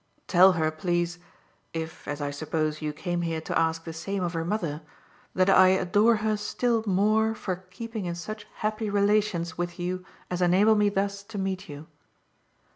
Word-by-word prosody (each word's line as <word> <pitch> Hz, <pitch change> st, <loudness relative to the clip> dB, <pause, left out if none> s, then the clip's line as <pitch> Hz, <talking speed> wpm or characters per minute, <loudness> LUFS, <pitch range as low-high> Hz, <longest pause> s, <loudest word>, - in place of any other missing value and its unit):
"Tell 185 Hz, +1 st, +6 dB
her, 160 Hz, -2 st, +1 dB
please 175 Hz, +2 st, -1 dB, 0.5 s
if, 160 Hz, 0 st, -6 dB
as 145 Hz, 0 st, -4 dB
I 145 Hz, 0 st, -2 dB
suppose, 155 Hz, +1 st, -2 dB
you 155 Hz, -1 st, -2 dB
came 175 Hz, +3 st, -3 dB
here 165 Hz, -1 st, -1 dB
to -, -, -4 dB
ask 165 Hz, 0 st, +1 dB
the 165 Hz, -, -7 dB
same 190 Hz, +4 st, -3 dB
of 175 Hz, 0 st, -2 dB
her 165 Hz, -1 st, -1 dB
mother 170 Hz, -5 st, -2 dB, 0.5 s
that 185 Hz, 0 st, +3 dB
I 185 Hz, -1 st, +7 dB
adore 190 Hz, +5 st, +4 dB
her 215 Hz, -1 st, +2 dB
still 230 Hz, +2 st, 0 dB
more 215 Hz, +3 st, +2 dB
for 185 Hz, -3 st, -5 dB
keeping 225 Hz, +1 st, -6 dB
in 170 Hz, -1 st, -3 dB
such 205 Hz, +5 st, -7 dB, 0.2 s
happy 215 Hz, 0 st, -1 dB
relations 200 Hz, -5 st, +1 dB
with 175 Hz, 0 st, -3 dB
you 180 Hz, +1 st, -3 dB, 0.3 s
as 180 Hz, 0 st, -2 dB
enable 190 Hz, +5 st, +5 dB
me 210 Hz, -1 st, +3 dB
thus 200 Hz, 0 st, -1 dB
to 215 Hz, 0 st, -8 dB
meet 190 Hz, -2 st, -3 dB
you." 145 Hz, +1 st, -8 dB
185 Hz, 180 wpm, -27 LUFS, 165-205 Hz, 0.5 s, I